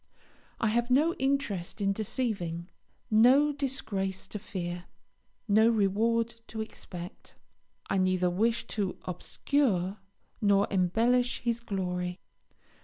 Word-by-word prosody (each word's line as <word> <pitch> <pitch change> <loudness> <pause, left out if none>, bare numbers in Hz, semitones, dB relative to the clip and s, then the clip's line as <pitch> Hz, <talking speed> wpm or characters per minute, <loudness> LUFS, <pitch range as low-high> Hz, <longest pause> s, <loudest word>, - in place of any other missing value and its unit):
I 225 - +2
have 240 +2 +1
no 300 +7 +4
interest 260 -10 -1
in 195 -1 +2
deceiving, 195 -6 -2 0.4
no 255 +7 +6
disgrace 220 -9 -2
to 210 - -5
fear, 175 -3 -5 0.6
no 220 +2 +5
reward 230 +2 +2
to 220 - -7
expect. 180 -4 -8 0.5
I 195 - +1
neither 185 -1 +2
wish 225 +6 +1
to 200 -4 -2
obscure 190 - 0 0.4
nor 200 -1 +4
embellish 230 +7 +2
his 235 -1 0
glory. 180 -4 -3
210 Hz, 110 wpm, -29 LUFS, 185-235 Hz, 0.6 s, no